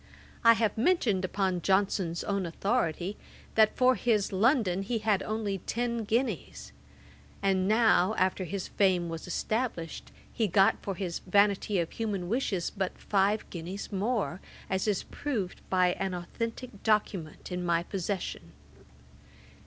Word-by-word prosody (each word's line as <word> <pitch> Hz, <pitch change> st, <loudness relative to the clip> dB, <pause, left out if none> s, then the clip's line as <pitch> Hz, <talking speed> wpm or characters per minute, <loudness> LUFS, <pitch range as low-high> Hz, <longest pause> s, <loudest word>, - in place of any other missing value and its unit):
I 230 Hz, 0 st, +8 dB
have 220 Hz, -1 st, 0 dB
mentioned, 230 Hz, -, +2 dB
upon 185 Hz, -1 st, 0 dB
Johnson's 190 Hz, -3 st, +1 dB
own 200 Hz, -3 st, -1 dB
authority, 190 Hz, 0 st, -1 dB, 0.4 s
that 220 Hz, -1 st, +4 dB
for 255 Hz, 0 st, +5 dB
his 225 Hz, -5 st, +1 dB
London 200 Hz, -2 st, +2 dB
he 225 Hz, +4 st, -1 dB
had 210 Hz, -3 st, +1 dB
only 210 Hz, -2 st, -2 dB
ten 235 Hz, +2 st, -2 dB
guineas; 235 Hz, +5 st, -2 dB, 0.7 s
and 190 Hz, -1 st, +2 dB
now, 220 Hz, -2 st, +4 dB
after 185 Hz, 0 st, +1 dB
his 190 Hz, +2 st, -4 dB
fame 185 Hz, -4 st, +2 dB
was 165 Hz, +1 st, -6 dB
established, 215 Hz, -3 st, -3 dB, 0.2 s
he 225 Hz, -, +1 dB
got 195 Hz, +1 st, +4 dB
for 195 Hz, -, -3 dB
his 175 Hz, -2 st, -3 dB
Vanity 200 Hz, +1 st, +2 dB
of 170 Hz, -2 st, -1 dB
Human 205 Hz, -6 st, -3 dB
Wishes 210 Hz, -7 st, -1 dB
but 190 Hz, -2 st, -2 dB
five 205 Hz, +1 st, +1 dB
guineas 180 Hz, +5 st, -6 dB
more, 200 Hz, -2 st, -1 dB, 0.3 s
as 190 Hz, +2 st, 0 dB
is 205 Hz, -3 st, +1 dB
proved 220 Hz, -11 st, -4 dB
by 185 Hz, -1 st, +4 dB
an 190 Hz, -1 st, -3 dB
authentick 230 Hz, +5 st, -5 dB
document 200 Hz, -7 st, -1 dB
in 180 Hz, 0 st, -2 dB
my 170 Hz, -1 st, +1 dB
possession. 180 Hz, -, -4 dB
195 Hz, 135 wpm, -29 LUFS, 180-220 Hz, 0.7 s, I